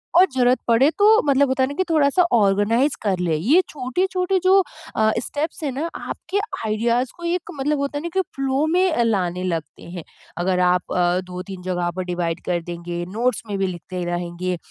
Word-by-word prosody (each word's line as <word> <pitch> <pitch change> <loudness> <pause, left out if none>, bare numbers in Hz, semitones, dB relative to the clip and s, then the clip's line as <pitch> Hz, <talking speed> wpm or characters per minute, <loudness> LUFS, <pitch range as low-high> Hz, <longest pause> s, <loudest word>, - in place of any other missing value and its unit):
और 360 +2 +8
ज़रूरत 250 0 +4
पड़े 240 +5 +5
तो 410 - +5 0.2
मतलब 280 0 +4
होता 260 0 +1
है - - +2
ना - - -5
कि 375 - +1
थोड़ा-सा 310 +2 +3
ऑर्गनाइज़ 220 +6 +3
कर 195 -4 0
लें। 170 -3 0
ये 265 - +4
छोटे-छोटे 365 +8 -1
जो 380 +1 +6 0.4
अ, 220 0 +3
स्टेप्स 310 +5 -4
हैं 285 - -1
ना 300 +6 -3
आपके 395 - -5 0.3
आइडियाज़ 235 +4 0
को 345 - -12
एक 345 0 -2
मतलब 295 +2 0
होता 280 +1 -2
है - - -3
ना, 340 - -3
कि 380 - +2
फ्लो 275 +2 0
में 365 +3 +2
अ, 240 -7 +2
लाने 185 -5 0
लगते 165 -5 -4
हैं। 175 -1 -8 0.3
अगर 180 +1 0
आप 180 0 0
अ, 180 0 +2
2-3 185 +1 -8
जगह 180 -1 -1
पर 185 - -2
डिवाइड 175 -2 -2
कर 175 -1 0
देंगे 175 0 -5
नोट्स 245 0 0
में 200 - -2
भी 195 - 0
लिखते 180 0 -5
रहेंगे 175 +1 -3
230 Hz, 200 wpm, -22 LUFS, 180-290 Hz, 0.4 s, और